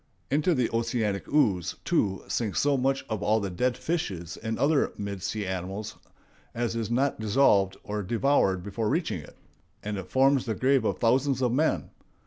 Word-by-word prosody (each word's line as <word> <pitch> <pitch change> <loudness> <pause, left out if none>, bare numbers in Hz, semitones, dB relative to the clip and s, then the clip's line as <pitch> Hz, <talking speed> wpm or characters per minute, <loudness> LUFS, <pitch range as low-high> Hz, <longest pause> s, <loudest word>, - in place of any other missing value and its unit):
Into 155 +4 +2
the 125 -3 +2
oceanic 115 -3 -1
ooze, 95 - +2
too, 100 - +1
sinks 110 -5 -1
so 145 0 +3
much 135 +1 0
of 110 -3 -3
all 110 +2 +2
dead 105 +6 -1
fishes 100 - -3
and 110 0 -4
other 140 +3 +2
mid 100 -2 -5
sea 105 +2 -3
animals 95 +3 -4 0.6
as 115 -1 -1
is 115 -2 -2
not 130 +3 +1
dissolved 105 -3 +3
or 105 0 -3
devoured 105 -3 +1
before 105 +2 -2
reaching 160 - -1
it; 75 - -15 0.5
and 105 -1 -3
it 95 - -8
forms 135 0 +3
the 110 - -1
grave 130 -2 +2
of 100 -3 0
thousands 130 +2 +2
of 125 - +2
men. 130 - 0
115 Hz, 170 wpm, -27 LUFS, 100-135 Hz, 0.6 s, so